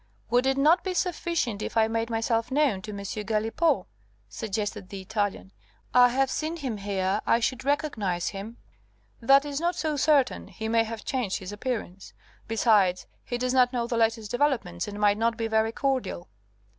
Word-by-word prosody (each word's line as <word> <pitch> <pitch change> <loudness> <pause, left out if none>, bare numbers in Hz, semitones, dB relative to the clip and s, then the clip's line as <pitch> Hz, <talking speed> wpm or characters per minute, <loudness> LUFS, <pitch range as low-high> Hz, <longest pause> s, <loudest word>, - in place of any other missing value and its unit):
"Would 245 +2 +3
it 270 0 +2
not 315 +5 +4
be 375 -1 -3
sufficient 335 - -1
if - - -4
I 220 0 +5
made 225 +1 -2
myself 225 0 0
known 275 -8 +1
to 215 - -7
M. 200 - -6
Galipaud?" 220 - 0 0.4
suggested 205 - -4
the 200 - -6
Italian. 205 -1 -3 0.4
"I 245 0 +7
have 265 +2 +1
seen 315 +2 -2
him 260 -8 -4
here, 195 0 -1
I 230 - +4
should 250 +2 -1
recognize 220 - -1
him 210 +4 -8 0.3
" - - -38 0.3
"That 275 +4 +5
is 285 -1 -3
not 345 +1 0
so 310 -4 -1
certain; 280 -3 +2
he 220 - -6
may 225 0 +3
have 225 -1 -7
changed 245 -8 -1
his 190 +1 -7
appearance. 205 -4 -5 0.3
Besides, 210 -5 +3 0.2
he 245 - -3
does 250 +1 -1
not 250 -1 +4
know 240 -2 0
the 235 - -3
latest 225 -2 +1
developments, 235 -11 0
and 205 0 -6
might 205 0 +3
not 230 0 +1
be 230 - -2
very 220 0 +1
cordial." 260 - -2
230 Hz, 180 wpm, -27 LUFS, 210-265 Hz, 0.4 s, I